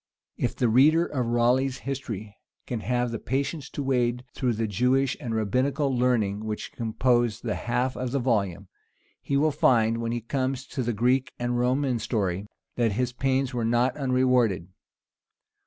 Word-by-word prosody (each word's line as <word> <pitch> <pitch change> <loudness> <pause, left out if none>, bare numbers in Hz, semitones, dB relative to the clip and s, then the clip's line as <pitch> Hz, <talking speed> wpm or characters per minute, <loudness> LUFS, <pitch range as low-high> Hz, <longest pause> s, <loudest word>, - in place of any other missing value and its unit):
If - - -2
the 125 - +1
reader 150 +9 +5
of 130 -7 -2
Raleigh's 125 +3 +2
history 115 -7 -5 0.3
can 120 - -3
have 120 +1 -1
the 115 - -4
patience 140 +2 -2
to 145 - -4
wade 125 -2 0
through 125 -2 0
the 115 +1 -1
Jewish 125 +6 +1
and 120 -6 -3
rabbinical 130 +6 0
learning 110 -5 +1
which 105 -1 -4
compose 120 0 +1
the 115 -3 -2
half 125 +3 -1
of 130 0 -3
the 140 - -1
volume, 100 -7 0 0.5
he 140 - 0
will 155 +2 +3
find, 115 -4 +3
when 115 0 -2
he 120 0 -2
comes 130 +2 -2
to 135 - -3
the 120 -1 -1
Greek 125 +4 +1
and 120 0 -1
Roman 125 0 +1
story, 100 -4 -2 0.3
that 115 -3 +2
his 125 +3 -1
pains 135 +1 0
are 120 -2 -1
not 120 +3 +2
unrewarded. 125 - +1
125 Hz, 165 wpm, -26 LUFS, 115-130 Hz, 0.5 s, reader